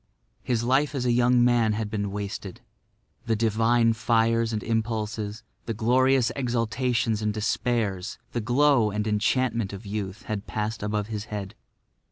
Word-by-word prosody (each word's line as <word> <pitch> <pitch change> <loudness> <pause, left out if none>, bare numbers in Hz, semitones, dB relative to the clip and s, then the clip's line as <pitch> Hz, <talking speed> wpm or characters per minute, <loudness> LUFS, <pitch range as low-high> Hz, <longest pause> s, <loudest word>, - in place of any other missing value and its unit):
His 120 -2 -1
life 135 +4 +2
as 130 -2 -1
a 120 - +3
young 120 0 +4
man 120 -3 +3
had 105 0 -3
been 100 -2 -2
wasted. 100 -1 -6 0.7
The 115 - +2
divine 115 +1 +3
fires 115 0 +2
and 110 -1 -3
impulses, 110 -1 -2 0.2
the 115 - -2
glorious 125 +3 +3
exaltations 120 -2 0
and 105 0 0
despairs, 110 -2 -1
the 120 - -2
glow 125 0 +3
and 105 +1 -2
enchantment 110 0 0
of 100 +3 -8
youth 100 0 -5
had 105 -1 -4
passed 110 +1 -3
above 105 0 -1
his 105 -1 -4
head. 100 -3 -6
115 Hz, 150 wpm, -26 LUFS, 105-120 Hz, 0.7 s, young